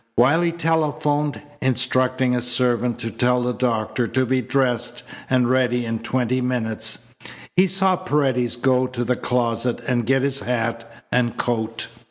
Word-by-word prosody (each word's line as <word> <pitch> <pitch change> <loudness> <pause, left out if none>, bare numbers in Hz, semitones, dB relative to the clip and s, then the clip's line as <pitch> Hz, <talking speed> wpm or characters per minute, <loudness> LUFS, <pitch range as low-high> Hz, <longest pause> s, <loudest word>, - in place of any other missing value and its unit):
While 135 +8 +4
he 170 -1 +1
telephoned, 150 -3 0 0.2
instructing 130 0 +1
a 120 - 0
servant 120 0 +1
to 115 -1 -4
tell 125 0 +1
the 125 0 0
doctor 120 -1 -1
to 130 +2 0
be 130 +1 +1
dressed 125 -2 -1 0.3
and 125 -2 +3
ready 125 -1 +1
in 115 0 -2
twenty 125 +2 -1
minutes, 115 -1 -2 0.4
he 185 +1 +5
saw 190 0 +2
Paredes 135 -9 0
go 130 +1 +2
to 125 -1 -3
the 125 +1 0
closet 120 0 -1
and 120 -3 0
get 135 0 +2
his 140 -1 0
hat 115 -1 -3 0.2
and 120 -2 +1
coat. 115 -2 -1
125 Hz, 155 wpm, -22 LUFS, 120-130 Hz, 0.4 s, he